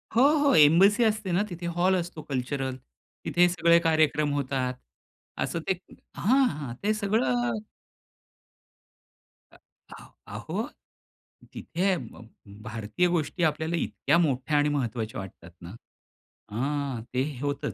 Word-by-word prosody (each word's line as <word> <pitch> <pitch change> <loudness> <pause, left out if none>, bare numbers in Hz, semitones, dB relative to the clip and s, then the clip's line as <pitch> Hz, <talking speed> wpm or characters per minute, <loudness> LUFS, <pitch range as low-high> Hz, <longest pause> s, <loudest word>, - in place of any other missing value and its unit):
हो, 235 - +5 0.3
हो. - - +4
एम्बसी 190 +10 +6
असते 215 -3 0
ना 175 +3 +2
तिथे. 175 -1 -7
हॉल 175 +2 +2
असतो 175 -3 -4
कल्चरल. 135 0 -2 0.5
तिथे 175 0 +4
सगळे 170 -1 +4
कार्यक्रम 155 -2 +2
होतात. 130 -2 -1 0.6
असं 170 - -2
ते 190 - +1 0.4
हां, 260 +7 +3
हां. 140 -5 -6
ते 215 +1 +2
सगळं 230 +3 0 1.9
अ - - -19 0.4
आ - - -13 0.3
अहो - - -3 0.9
तिथे 185 +3 -1
भ 120 -4 -10 0.4
भारतीय 110 +9 -1
गोष्टी 175 0 -1
आपल्याला 160 +1 0
इतक्या 170 - 0
मोठ्या 150 -2 +1
आणि 145 0 +3
महत्त्वाच्या 115 -6 -2
वाटतात 90 -2 -10
ना. 85 0 -9 0.8
हा 135 +1 -2
ते 130 +1 +1 0.2
होतंच. 145 0 -2
155 Hz, 120 wpm, -27 LUFS, 135-180 Hz, 1.9 s, एम्बसी